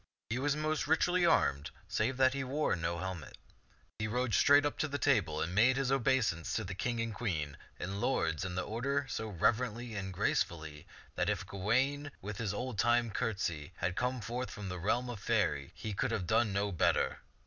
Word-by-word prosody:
He 120 - 0
was 145 +2 +1
most 155 0 -1
richly 175 +2 +3
armed 70 - +2 0.2
save 125 +4 0
that 130 -1 +4
he 135 -1 -2
wore 140 -2 0
no 85 0 -2
helmet. 90 -6 -5 0.6
He 110 - -1
rode 120 +1 -1
straight 145 +7 +6
up 145 - -2
to 155 - +1
the 145 -1 -2
table 105 - +2
and 80 +3 -2
made 120 +6 +5
his 135 -1 0
obeisance 125 -10 +1
to 110 - 0
the 95 -1 -5
King 120 +5 -2
and 115 -1 -2
Queen 80 -10 -2 0.2
and 95 +3 -4
lords 80 - +1
in 90 -1 -4
their 95 - -1
order 140 +6 -1
so 110 -2 -3
reverently 115 +5 0
and 95 -2 -4
gracefully 80 -4 -1 0.3
that - - 0
if - - -1
Gawain 130 +9 0
with 105 +1 -6
his 105 -4 -1
oldtime 120 +1 +1
courtesy 95 -9 -2
had 90 +1 -2
come 125 0 -1
forth 120 +4 -3
from 105 -2 -6
the 90 0 -4
realm 120 +7 +1
of 120 -4 -5
Faerie, - - 0
he 110 - -5
could 100 - 0
have 95 - -1
done 110 +2 +2
no 100 +1 0
better. 85 - +1
110 Hz, 195 wpm, -33 LUFS, 95-130 Hz, 0.6 s, straight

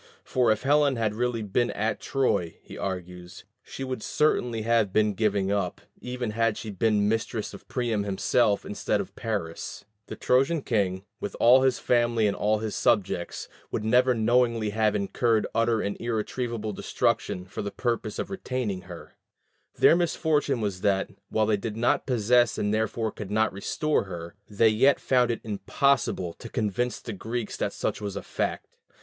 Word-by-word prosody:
"For 125 -3 +2
if 110 - 0
Helen 145 0 +3
had 110 -3 0
really 120 0 -1
been 120 +4 +1
at 110 +2 -1
Troy," 125 -11 0
he - - -11
argues, 90 -2 -6 0.2
"she 135 - -7
would 130 -3 -4
certainly 120 -7 +1
have 115 -3 +2
been 105 +1 +2
given 100 -2 +1
up, 100 -3 -1 0.2
even 125 -2 -4
had 115 0 +1
she 110 - -6
been 105 +1 +2
mistress 110 -1 -2
of 100 - -12
Priam 120 -4 -1
himself 100 +2 +1
instead 105 - -1
of - - -6
Paris: 100 -8 -4 0.2
the - - -6
Trojan 135 +4 +2
king, 95 -5 0 0.2
with - - -5
all 125 +3 +7
his 130 -2 +3
family 120 -2 +2
and 100 - +1
all 105 +1 +1
his 110 0 -4
subjects, 95 -5 0 0.2
would - - -3
never 125 +3 +4
knowingly 115 -1 +2
have 110 0 +1
incurred 110 +2 +1
utter 115 -1 +2
and 100 - -3
irretrievable 115 -1 -2
destruction 90 -1 -1
for 95 - -6
the 100 - -3
purpose 115 -2 -2
of - - -4
retaining 125 - -3
her: 85 - -10 0.6
their - - +6
misfortune 155 -6 +1
was 100 -4 -2
that, 100 -1 +1 0.2
while 110 - +2
they 105 -1 +2
did 110 +1 -5
not 120 +1 +1
possess 120 -1 +3
and 105 0 0
therefore 110 +1 -1
could 105 -3 -8
not 110 +1 +1
restore 145 +7 0
her, 85 -2 -7 0.2
they 105 +2 +3
yet 135 +6 +4
found 125 -2 +2
it 115 - -2
impossible 110 -3 0
to 115 - -10
convince 120 +2 -1
the 115 - -6
Greeks 115 +3 -4
that - - -1
such - - -3
was 100 -2 -4
the - - -5
fact." - - -2
110 Hz, 170 wpm, -26 LUFS, 100-120 Hz, 0.6 s, all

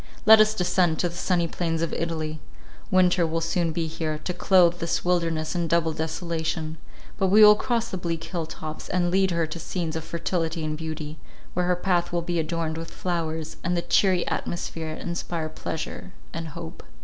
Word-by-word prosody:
Let 220 0 +9
us 215 0 +3
descend 180 -3 +2
to 175 - +1
the 170 - -10
sunny 175 -1 +1
plains 165 -1 -1
of 165 - -2
Italy. 160 -2 -2 0.5
Winter 185 -1 +4
will 165 +1 -1
soon 165 +1 0
be 165 +1 -1
here, 155 -1 -3
to 180 - -2
clothe 175 -1 +4
this 170 +1 -1
wilderness 165 -3 +1
in 170 -2 0
double 165 -1 +2
desolation; 160 0 -3 0.4
but 195 - +3
we 210 +3 +7
will 210 0 +10
cross 235 +1 -1
the 190 - -3
bleak 165 -2 -3
hill 170 -4 -3
tops, 155 -1 -7
and 175 -1 +1
lead 190 +1 +3
her 170 -2 +1
to 160 +2 -6
scenes 165 -1 -3
of 160 - -3
fertility 165 -1 -2
and 155 0 -2
beauty, 155 -1 -6 0.3
where 180 0 0
her 180 - +3
path 175 -1 0
will 175 -1 0
be 175 0 -1
adorned 160 0 -2
with 165 - -6
flowers, 160 -3 -3
and 175 0 0
the 170 - -1
cheery 185 -3 +3
atmosphere 165 -2 -3
inspire 165 0 -3
pleasure 160 +4 -6 0.2
and 165 0 -4
hope." 80 - -8
170 Hz, 190 wpm, -25 LUFS, 160-180 Hz, 0.5 s, will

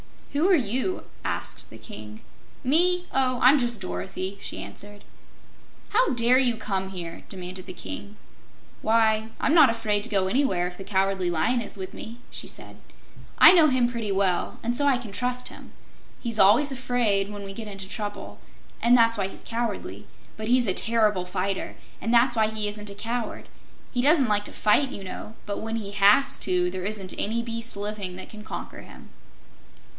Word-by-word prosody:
"Who 300 +5 +2
are 380 - +6
you?" 260 - -1 0.2
asked - - -3
the - - -11
King. 110 - -10 0.4
"Me? 355 +6 +3
Oh, 255 -1 +2
I'm 270 +4 +7
just 240 -2 0
Dorothy," 95 - -4
she - - -5
answered. 205 0 -7 0.9
"How - - +3
dare 240 +1 +4
you 245 -3 +2
come 195 -3 -3
here?" 175 -3 -7
demanded 185 0 -7
the - - -6
King. 135 - -7 0.7
"Why, 220 -1 +2
I'm 290 - +1
not 310 -5 +8
afraid 215 -3 0
to 230 - -1
go 195 -3 +2
anywhere, 195 -6 +1
if 180 0 -8
the 195 - -8
Cowardly 190 -2 +1
Lion 175 +9 +1
is 210 - -7
with 190 -1 -6
me," 230 +2 -8
she - - -5
said. - - -9 0.6
"I - - +10
know 335 -4 +6
him 255 -4 +3
pretty 230 -4 -3
well, 190 -2 0
and 240 +1 -1
so 285 +2 +2
I 270 -3 +4
can 240 -4 -8
trust 250 +4 -2
him. - - -13 0.5
He's 230 -3 -1
always 240 +9 +5
afraid, 240 -6 0
when 205 -1 -7
we 195 0 -6
get 220 +1 -7
into 195 -2 -5
trouble, 205 -2 -5 0.4
and 240 +1 +5
that's 230 -1 +4
why 195 -2 0
he's - - -10
cowardly; 210 - -4 0.3
but 215 0 -4
he's 245 +1 +4
a 190 - +1
terrible 215 -5 +2
fighter, 190 +2 -3 0.2
and 230 - -2
that's 240 +1 +4
why 220 -1 +4
he 215 -1 -1
isn't 210 0 -5
a 200 - -9
coward. 230 +3 -4 0.4
He 245 - 0
doesn't 280 -2 +4
like 205 0 +1
to - - -7
fight, 260 +6 +3
you 200 -7 -7
know, 210 +3 -8
but 205 - -4
when 225 +1 -3
he 205 -3 -4
HAS 205 +7 +5
to, 180 -1 +1
there 185 0 -5
isn't 200 -3 -3
any 230 +3 0
beast 230 0 -3
living 205 -3 -4
that 185 - -8
can 210 -1 -10
conquer - - -7
him." - - -14
215 Hz, 190 wpm, -25 LUFS, 195-245 Hz, 0.9 s, I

